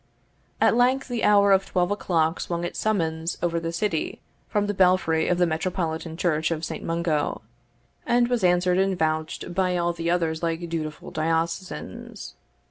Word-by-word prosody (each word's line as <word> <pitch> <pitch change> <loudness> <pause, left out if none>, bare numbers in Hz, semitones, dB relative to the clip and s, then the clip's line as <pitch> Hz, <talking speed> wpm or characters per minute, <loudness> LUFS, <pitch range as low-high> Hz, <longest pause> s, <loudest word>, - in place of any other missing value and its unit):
At - - +4
length 255 +2 +2
the 240 -2 -2
hour 200 -1 +5
of 195 0 +5
twelve 180 +1 0
o'clock 165 -5 0
swung 170 0 -3
its 175 - -4
summons 165 -6 -1
over 170 -1 +1
the 165 0 -3
city 170 -1 -2 0.3
from 205 -1 +1
the 205 - -1
belfry 180 -4 +3
of 180 - +2
the 175 - +4
metropolitan 160 -1 -2
church 160 -3 +1
of 165 -1 -2
St. - - -6
Mungo, 165 -3 -1 0.6
and 240 0 +3
was 245 -4 0
answered 180 0 +3
and 190 -1 +1
vouched 160 +2 -2
by 180 -1 +1
all 175 0 0
the 170 0 -3
others 165 -2 0
like 170 0 -2
dutiful 155 -2 -5
diocesans. 165 +3 -3
175 Hz, 165 wpm, -25 LUFS, 160-190 Hz, 0.6 s, hour